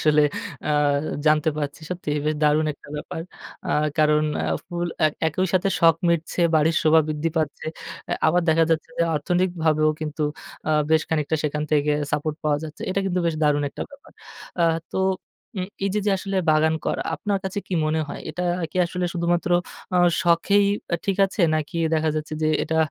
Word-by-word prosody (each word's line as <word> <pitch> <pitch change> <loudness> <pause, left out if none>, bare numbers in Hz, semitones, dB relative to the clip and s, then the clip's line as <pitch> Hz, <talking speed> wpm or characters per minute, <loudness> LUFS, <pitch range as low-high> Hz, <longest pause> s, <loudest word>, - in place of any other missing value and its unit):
আসলে 150 -1 +4 0.5
আ - - +2 0.6
জানতে 155 +1 +4
পারছি। 145 +1 -4
সত্যি 180 -4 -4 0.2
বেশ 155 - +1
দারুণ 150 +1 +3
একটা - - -18
ব্যাপার। 160 +2 -5 0.5
আ - - 0 0.3
কারণ 150 0 +4 0.2
আ - - 0
ফুল 175 -1 -3 0.2
এক 155 - 0 0.2
একই 185 +5 0
সাথে 185 +2 +3
শখ 165 -1 +6
মিটছে, 170 +1 0
বাড়ির 160 +1 +3
শোভা 160 +1 +6
বৃদ্ধি 155 +1 -1
পাচ্ছে। 155 -3 -2 0.4
আ - - +1
আবার 175 +3 +3
দেখা 165 +1 +5
যাচ্ছে 165 0 0
যে, - - +4
অর্থনৈতিকভাবেও 160 -2 +1
কিন্তু 155 0 -3 0.5
আ - - +2 0.2
বেশ 160 -1 +4
খানিকটা 160 0 0
সেখান 150 0 -1
থেকে 150 0 +3 0.2
সাপোর্ট 150 +1 -1
পাওয়া 150 -1 +2
যাচ্ছে। 155 -1 -8
এটা 195 - 0
কিন্তু 180 -1 0
বেশ 165 - +1
দারুণ 145 -1 +3
একটা - - -6
ব্যাপার। 280 0 -16 0.5
আ - - +5 0.3
তো - - -1 0.6
উম 185 - -2 0.2
এই 195 - +1
যে, 210 - +1
যে, - - +4
আসলে 195 0 -3
বাগান 155 +1 +3
করা - - 0
আপনার 200 +5 -1
কাছে 190 +1 -3
কি 185 - -3
মনে 155 +1 +1
হয়? - - -6
এটা 175 +4 -4 0.3
কি - - -9
আসলে 180 +1 -3
শুধুমাত্র 175 0 0 0.4
আ - - +4 0.3
শখেই 200 +4 +3 0.3
আ - - +2
ঠিক 195 - +1
আছে 195 - -5
নাকি 155 +2 -2 0.2
দেখা 160 0 +1
যাচ্ছে 155 0 -4
যে, 155 - +3
এটা 160 - -1
160 Hz, 185 wpm, -23 LUFS, 155-175 Hz, 0.6 s, শখ